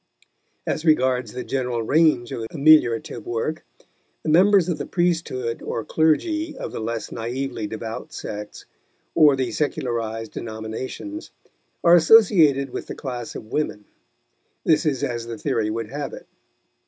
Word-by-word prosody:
As 155 - -2
regards 130 -7 +2
the 125 - -5
general 125 -3 -2
range 145 -2 +3
of 115 -1 -4
ameliorative 145 -7 +3
work, 120 +7 -3 0.6
the - - -2
members 185 +2 +5
of 170 -4 -2
the 145 - -4
priesthood 160 -9 -1
or 115 - -4
clergy 315 - +1
of - - -5
the - - -5
less 115 0 -4
naively 120 -1 -3
devout 110 +1 -6
sects, 105 0 -7 0.5
or 150 -4 +6
the 130 -1 -2
secularized 115 -6 -2
denominations, 115 - -6 0.5
are 170 - +6
associated 160 - +6
with - - -6
the - - -6
class 125 -4 -6
of 110 - -9
women. 105 -9 -2 0.8
This 155 -1 +3
is 135 -4 0
as 120 -1 -3
the 115 -1 -5
theory 110 0 -1
would 110 0 -4
have 145 0 -4
it. - - -10
130 Hz, 140 wpm, -23 LUFS, 115-155 Hz, 0.8 s, or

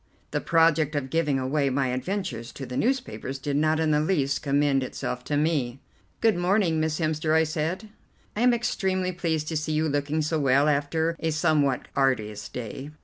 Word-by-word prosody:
The - - -1
project 160 -2 +3
of 135 -2 -2
giving 155 -4 +1
away 135 +2 0
my 135 0 0
adventures 130 - -3
to 135 - -7
the 125 - -7
newspapers 245 - -1
did 140 +1 -3
not 155 +2 +2
in 160 -1 +2
the 150 - +3
least 145 -4 0
commend 140 -1 +2
itself 125 -1 -4
to 145 - 0
me. 145 -5 0 0.4
"Good 225 -2 +4
morning, 175 -2 +2
Miss 155 -1 0
Hemster," 155 -1 0
I 160 - +5
said, 160 +6 -2 0.5
"I 215 - -2
am 250 0 +5
extremely 190 -6 0
pleased 160 -4 -2
to 160 - -1
see 155 +1 -2
you 155 +1 +1
looking 145 +2 0
so 155 +1 0
well 140 +1 +3
after 155 +3 +1
a 160 - -1
somewhat 155 -4 +1
arduous 115 -7 0
day." 125 +4 -6
155 Hz, 185 wpm, -26 LUFS, 140-165 Hz, 0.5 s, I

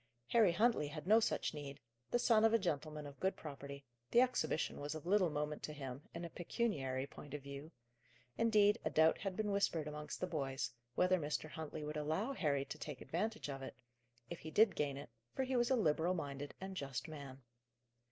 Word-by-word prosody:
Harry 220 -6 +6
Huntley 210 -4 +3
had 150 +1 -6
no 215 +4 +7
such 220 - 0
need: 145 -2 -6 0.3
the - - +3
son 230 -2 +4
of 225 0 +6
a - - +7
gentleman 155 -5 -2
of 140 -1 -10
good 190 +1 +1
property, 140 -2 -8 0.2
the 235 - +5
exhibition 250 -10 +1
was 145 +2 -3
of 155 - -7
little 185 -1 +4
moment 150 0 -2
to 150 - -4
him, 135 -2 -6
in 170 +1 -5
a - - -5
pecuniary 145 - -1
point 145 +1 -9
of 145 - -6
view; 140 +3 -7 0.6
indeed, 210 -2 +4
a - - +1
doubt 160 +1 +4
had 195 -2 -3
been 210 0 0
whispered 200 -6 +1
amongst 150 0 -5
the - - 0
boys, 135 -6 -2 0.2
whether 180 0 +4
Mr. 155 0 -2
Huntley 155 -1 -5
would 150 +1 -3
allow 160 - 0
Harry 140 - +1
to 155 - -7
take 150 -4 -5
advantage 215 +5 -2
of 135 -1 -5
it, 135 - -6 0.5
if 170 - -6
he 160 - -7
did 210 +4 +5
gain 140 -2 0
it, 140 -4 -8 0.2
for 265 - +1
he 260 0 -1
was 240 -1 +3
a 265 - +5
liberal 170 -3 +2
minded 145 -3 -4
and 190 0 -6
just 135 -6 -3
man. 140 -4 -8
155 Hz, 205 wpm, -38 LUFS, 145-200 Hz, 0.6 s, no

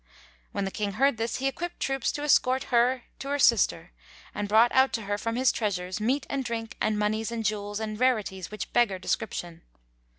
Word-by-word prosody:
When 200 - -2
the 195 - -3
King 205 -1 -3
heard 270 +3 +2
this, 230 +1 -2
he 270 - -1
equipped 345 +6 -4
troops 270 -2 0
to 290 - -4
escort 260 -3 +3
her 245 +1 +3 0.2
to 275 - -6
her 285 +1 0
sister 195 - +3 0.4
and 205 - -3
brought 225 +3 +5
out 265 0 +4
to 225 - -2
her 205 0 -1
from 230 +1 -2
his 255 0 +3
treasuries 185 -2 -2
meat 260 +5 0
and 275 -1 -2
drink 225 -2 -4
and 215 -1 +1
monies 215 +2 -1
and 225 -1 -3
jewels 205 0 -2
and 215 -1 -4
rarities 215 -8 0
which 215 -1 -6
beggar 235 -6 +3
description. 175 -3 -3
225 Hz, 200 wpm, -27 LUFS, 205-255 Hz, 0.4 s, brought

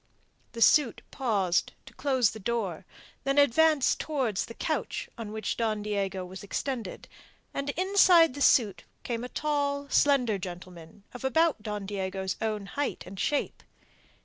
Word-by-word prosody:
The 230 -1 +2
suit 285 -7 +4
paused 200 -9 0
to - - -14
close 260 -6 +1
the 220 - -9
door, 195 -5 -3 0.4
then 275 +1 0
advanced 290 +1 +4
towards 260 -10 -1
the 230 - -10
couch - - -3
on 225 -3 -7
which 220 0 -3
Don 215 -3 -1
Diego 195 -3 -2
was 185 +1 -9
extended, 225 0 -4 0.5
and 280 0 -3
inside 365 -4 +5
the 285 - -7
suit 205 -10 +3 0.2
came 235 -1 -3
a 250 - -5
tall, 285 -1 -1
slender 250 -10 +3
gentleman 180 0 -9
of 250 - -9
about 320 0 +2
Don 210 -2 -4
Diego's 190 -1 -3
own 215 -2 -2
height 285 +8 -3
and 190 +1 -9
shape. 290 +5 -1
230 Hz, 145 wpm, -28 LUFS, 195-280 Hz, 0.5 s, inside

